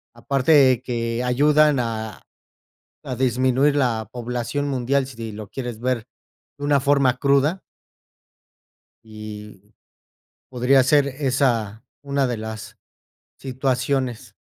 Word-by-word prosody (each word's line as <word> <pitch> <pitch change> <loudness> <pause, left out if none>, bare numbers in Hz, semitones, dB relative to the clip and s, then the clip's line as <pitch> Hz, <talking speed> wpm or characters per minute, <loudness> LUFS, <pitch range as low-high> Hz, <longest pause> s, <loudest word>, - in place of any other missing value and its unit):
Aparte 130 0 +3
que 115 -1 -2
ayudan 150 +3 +3
a 110 -3 -4 0.8
a 125 - -5
disminuir 130 +3 +2
la 115 -6 0
población 125 +4 -3
mundial 135 +1 0
si 115 -4 -8
lo 105 -1 -8
quieres 120 -4 -6
ver 125 -3 -1 0.5
de 145 - -6
una 145 -2 +3
forma 140 -2 +2
cruda 140 +7 +2 1.4
y 105 -2 -10 0.9
podría 130 +1 +3
ser 140 +2 +3
esa 130 -6 -1 0.2
una 140 -1 0
de 120 -2 -2
las 110 0 -8 0.6
situaciones. 130 -1 -2
130 Hz, 105 wpm, -22 LUFS, 115-140 Hz, 1.4 s, Aparte